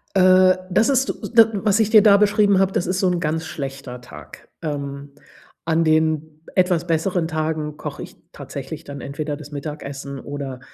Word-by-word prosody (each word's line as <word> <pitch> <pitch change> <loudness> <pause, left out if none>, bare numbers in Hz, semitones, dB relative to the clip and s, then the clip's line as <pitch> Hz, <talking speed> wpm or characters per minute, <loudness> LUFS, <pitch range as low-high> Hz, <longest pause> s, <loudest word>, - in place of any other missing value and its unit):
Äh, 185 0 +5
das 220 +7 +3
ist, 265 -1 +2
s - - -6
da 225 -1 +6
was 205 +1 +1
ich 220 -2 +2
dir 220 -1 +7
da 205 -2 +6
beschrieben 205 -1 +3
habe, 195 0 +2
das 180 - -1
ist 185 +1 -1
so 190 - +2
‘n 175 - -1
ganz 160 0 -2
schlechter 135 -4 -7
Tag. - - -13
Ähm, 140 -2 -5 0.5
an 165 0 +2
den 155 -1 0
etwas 180 -2 +2
besseren 165 +1 0
Tagen 155 -2 -3
koche - - -6
ich - - -12 0.2
tatsächlich 145 +3 -8
dann 140 -4 -8
entweder 145 +1 -4
das 150 0 -12
Mittagessen 140 -2 -6
oder, 140 -3 -6
160 Hz, 180 wpm, -21 LUFS, 145-190 Hz, 0.5 s, dir